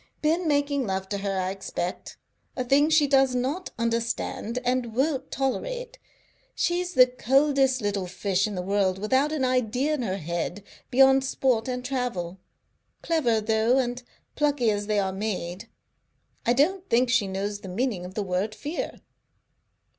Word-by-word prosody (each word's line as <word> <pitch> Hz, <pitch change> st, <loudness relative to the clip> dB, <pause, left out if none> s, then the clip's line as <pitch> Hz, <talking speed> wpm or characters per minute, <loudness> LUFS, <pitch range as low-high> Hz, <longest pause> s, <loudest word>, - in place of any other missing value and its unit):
"Been 330 Hz, +3 st, +2 dB
making 285 Hz, -3 st, +1 dB
love 190 Hz, 0 st, -2 dB
to 200 Hz, -, -2 dB
her, 195 Hz, -1 st, -2 dB
I 185 Hz, 0 st, -1 dB
expect. 190 Hz, -2 st, -5 dB, 0.4 s
A 255 Hz, -, 0 dB
thing 280 Hz, +4 st, +3 dB
she 310 Hz, -2 st, +5 dB
does 270 Hz, -2 st, +3 dB
not 275 Hz, +9 st, -2 dB
understand 230 Hz, 0 st, -2 dB
and 245 Hz, -2 st, 0 dB
won't 270 Hz, +1 st, 0 dB
tolerate. 485 Hz, -, -3 dB, 0.6 s
She's 355 Hz, +1 st, -1 dB
the 255 Hz, -, +9 dB
coldest 265 Hz, +1 st, +2 dB
little 200 Hz, -3 st, -1 dB
fish 190 Hz, +2 st, 0 dB
in 210 Hz, -, -5 dB
the 180 Hz, -, -3 dB
world, 195 Hz, -1 st, +1 dB
without 260 Hz, +9 st, +1 dB
an 295 Hz, -4 st, 0 dB
idea 255 Hz, +3 st, +1 dB
in 295 Hz, -, -1 dB
her 195 Hz, -5 st, -2 dB
head 170 Hz, +3 st, -4 dB, 0.3 s
beyond 265 Hz, +1 st, +5 dB
sport 255 Hz, -3 st, 0 dB
and 250 Hz, -1 st, -3 dB
travel. 235 Hz, -9 st, -3 dB, 0.6 s
Clever, 260 Hz, -10 st, +2 dB
though, 220 Hz, +3 st, +2 dB
and 245 Hz, -1 st, -1 dB, 0.3 s
plucky 285 Hz, -6 st, +2 dB
as 205 Hz, 0 st, -2 dB
they 210 Hz, -1 st, +1 dB
are 190 Hz, -1 st, 0 dB
made. 190 Hz, -2 st, -4 dB, 0.8 s
I 240 Hz, -, +5 dB
don't 365 Hz, +9 st, +1 dB
think 245 Hz, +1 st, +3 dB
she 245 Hz, -6 st, +3 dB
knows 200 Hz, +2 st, -3 dB
the 190 Hz, -, -9 dB
meaning 210 Hz, -1 st, -1 dB
of 180 Hz, +2 st, -9 dB
the 210 Hz, -, -1 dB
word 195 Hz, +3 st, -2 dB
fear." 300 Hz, +4 st, -5 dB
245 Hz, 160 wpm, -26 LUFS, 200-270 Hz, 0.8 s, the